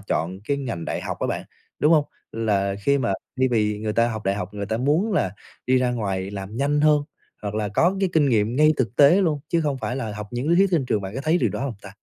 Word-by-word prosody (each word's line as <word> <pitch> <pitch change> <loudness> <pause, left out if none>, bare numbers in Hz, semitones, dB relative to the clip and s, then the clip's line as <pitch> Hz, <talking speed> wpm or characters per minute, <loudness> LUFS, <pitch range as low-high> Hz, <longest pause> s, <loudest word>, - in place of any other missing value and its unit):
chọn 95 -2 -2
cái 140 +4 0
ngành 120 -12 -4
đại - - -3
học - - -5
á - - 0
bạn, - - -3 0.3
đúng 150 - +4
hông? 155 -3 +4 0.3
Là 100 -3 0
khi 140 +3 +3
mà 120 -6 0 0.3
thay 130 0 +3
vì 105 -3 +1
người 110 0 -2
ta 115 +2 +3
học 110 -2 -5
đại 95 - +1
học, 100 0 -5
người 100 -1 -4
ta 110 +2 -1
muốn 150 - +1
là 95 - +1 0.4
đi 130 0 +4
ra 125 -1 +1
ngoài 100 -5 -2
làm 100 +1 -7
nhanh 145 +3 +1
hơn, 150 -1 +4 0.4
hoặc 105 0 -4
là 105 -1 -1
có 170 - +2
cái 195 - +2
kinh 150 -3 +3
nghiệm 110 0 +1
ngay 155 +2 +5
thực 120 -3 -1
tế 145 +5 +7
luôn, 155 -5 0
chứ 170 - +1
không 145 -4 -1
phải 125 - -3
là 115 -5 -3
học 105 -1 -6
những 125 +4 -3
lý 170 - +4
thuyết 195 +2 +5
trên 165 -7 +2
trường, 105 - 0
bạn 95 +1 -6
có 135 - -3
thấy 160 +3 +3
điều - - +1
đó - - -4
hông 135 -4 -3
ta? 100 - -9
120 Hz, 280 wpm, -23 LUFS, 105-145 Hz, 0.4 s, tế